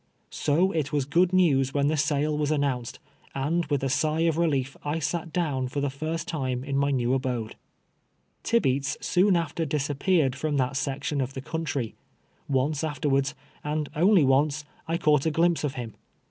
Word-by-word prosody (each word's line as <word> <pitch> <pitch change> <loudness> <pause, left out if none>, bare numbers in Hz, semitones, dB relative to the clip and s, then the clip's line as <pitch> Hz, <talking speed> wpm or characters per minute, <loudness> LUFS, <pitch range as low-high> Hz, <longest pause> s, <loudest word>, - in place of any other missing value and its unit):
So 170 +6 +2
it 155 -5 -1
was 145 -3 0
good 170 +6 +3
news 145 -8 +3
when 140 -1 +2
the 155 - +1
sale 150 0 +1
was 150 -1 0
an 150 -2 +1
nounced, 125 -4 -2 0.4
and 155 +5 0
with 145 -2 -1
a - - +1
sigh 155 +4 +1
of 165 -2 +2
relief 140 -6 0
I 145 +2 -1
sat 165 +2 -2
down 145 -6 -1
for 140 +3 -3
the 140 -1 -1
first 155 +4 -4
time 130 -6 -2
in 140 0 -3
my 140 +1 +2
new 125 -2 +1
abode. 125 -4 -2 0.9
Tibeats 135 - +1
soon 185 +1 +3
after 165 0 -1
disappeared 145 0 +1
from 145 +1 -1
that 130 0 0
section 140 +1 -2
of 130 +1 -4
the 130 - -4
country. 145 -6 -3 0.6
Once 140 +3 0
afterwards, 140 -2 0 0.3
and 150 0 -2
only 180 +2 +5
once, 145 +3 +2 0.2
I 165 +1 0
caught 150 -2 +3
a - - +4
glimpse 165 +1 +2
of 145 -2 -2
him. 115 -4 -6
145 Hz, 180 wpm, -26 LUFS, 135-160 Hz, 0.9 s, only